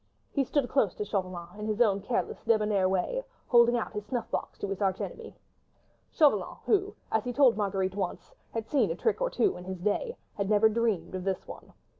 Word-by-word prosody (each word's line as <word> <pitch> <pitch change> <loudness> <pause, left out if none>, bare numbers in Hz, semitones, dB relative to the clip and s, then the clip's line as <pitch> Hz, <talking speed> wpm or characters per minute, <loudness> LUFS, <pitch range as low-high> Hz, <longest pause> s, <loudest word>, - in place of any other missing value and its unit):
He 280 - +1
stood 270 0 0
close 235 -9 +1
to 210 - -3
Chauvelin 185 -2 -4
in 210 - -4
his 215 0 -1
own 200 -4 +3
careless, 230 +4 -2
débonnaire 210 -4 +2
way, 190 - 0 0.2
holding 240 0 +5
out 230 - -3
his 210 -1 -4
snuff 240 0 -3
box - - -3
to - - -3
his 195 +1 -4
arch 195 -1 +1
enemy. - - -6 0.8
Chauvelin, 300 -4 +3
who, 405 -1 +1 0.2
as 220 -1 +2
he 245 - -2
told 255 -2 +5
Marguerite 195 -2 -1
once, 190 -3 -4 0.2
had 225 -1 -4
seen 260 -9 +2
a 165 - -1
trick 455 - 0
or - - +2
two 410 - +1
in 180 - -9
his 190 0 -5
day, 210 - -1 0.2
had 200 -1 -2
never 215 +1 +5
dreamed 220 -6 0
of 185 -1 -4
this 190 -1 -2
one. - - -11
210 Hz, 210 wpm, -29 LUFS, 195-245 Hz, 0.8 s, holding